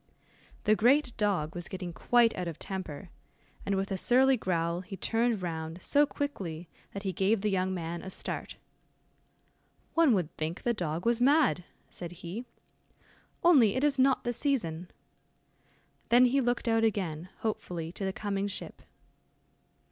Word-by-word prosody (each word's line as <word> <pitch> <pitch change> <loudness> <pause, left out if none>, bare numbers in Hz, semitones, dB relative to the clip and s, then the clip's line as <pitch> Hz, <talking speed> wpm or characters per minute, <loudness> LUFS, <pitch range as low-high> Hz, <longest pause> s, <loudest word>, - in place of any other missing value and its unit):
The 215 - +4
great 245 +3 +3
dog 190 -7 0
was 175 -1 -6
getting 180 -2 -6
quite 235 +4 +3
out 180 -1 -3
of 165 - -5
temper, 190 -2 -6 0.6
and, 200 - +1
with 195 +1 -2
a 190 - 0
surly 260 +6 +4
growl, 170 -5 -1
he 195 +1 -8
turned 230 -2 0
round 160 0 -4
so 290 +9 +3
quickly, 180 - -4 0.2
that 200 - -6
he 190 -2 -2
gave 195 +4 +1
the 210 0 0
young 185 0 0
man 170 -2 -4
a 190 - -7
start. - - -5 1.4
"One 320 -8 +5
would 175 -5 -2
think 155 +2 -4
the 240 - +2
dog 170 -4 -3
was 235 0 +2
mad," 275 - +4 0.2
said 175 -1 -8
he, 210 +9 -5 1.0
"only 270 - +6
it 260 - 0
is 285 -2 +2
not 265 0 +4
the 240 - -1
season." 185 - -1 1.2
Then 245 +2 +7
he 270 +3 +3
looked 245 -1 -1
out 225 0 +3
again 185 -6 -1
hopefully 175 -7 -3
to 195 - -7
the 190 - 0
coming 200 0 -2
ship. 200 - -8
195 Hz, 155 wpm, -30 LUFS, 175-240 Hz, 1.4 s, Then